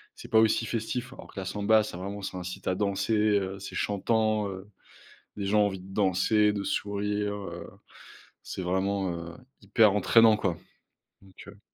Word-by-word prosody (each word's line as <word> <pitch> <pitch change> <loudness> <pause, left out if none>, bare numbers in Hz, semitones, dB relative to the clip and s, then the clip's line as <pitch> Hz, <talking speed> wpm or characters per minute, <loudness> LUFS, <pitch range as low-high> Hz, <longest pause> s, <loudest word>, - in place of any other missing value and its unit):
c'est - - -11
pas 110 - +6
aussi 110 +1 +3
festif, 120 +3 -3
alors - - -12
que 100 - -7
la 95 - -5
samba 105 +3 +3
ça 105 - -7
vraiment 100 +2 -6
ça 95 -1 -5
incite 90 0 -7
à 95 - +1
danser, 100 +2 -1 0.3
heu. 95 0 -5
C'est 95 - -8
chantant, 110 0 0
heu, 95 +1 -8 0.7
les 100 -1 -3
gens 105 +1 +3
ont - - +4
envie 95 -2 -4
de 95 +1 -12
danser, 105 +2 +3
de 100 -1 -3
sourire, 105 0 -2
heu, 100 -1 -7 0.8
c'est 95 - -6
vraiment, 95 +1 0
heu, 85 0 -7 0.3
hyper 105 +1 +4
entraînant 110 +2 +5
quoi. 90 -6 -1 0.7
Donc 95 -1 -15
heu 100 0 -13
100 Hz, 180 wpm, -28 LUFS, 95-105 Hz, 0.8 s, pas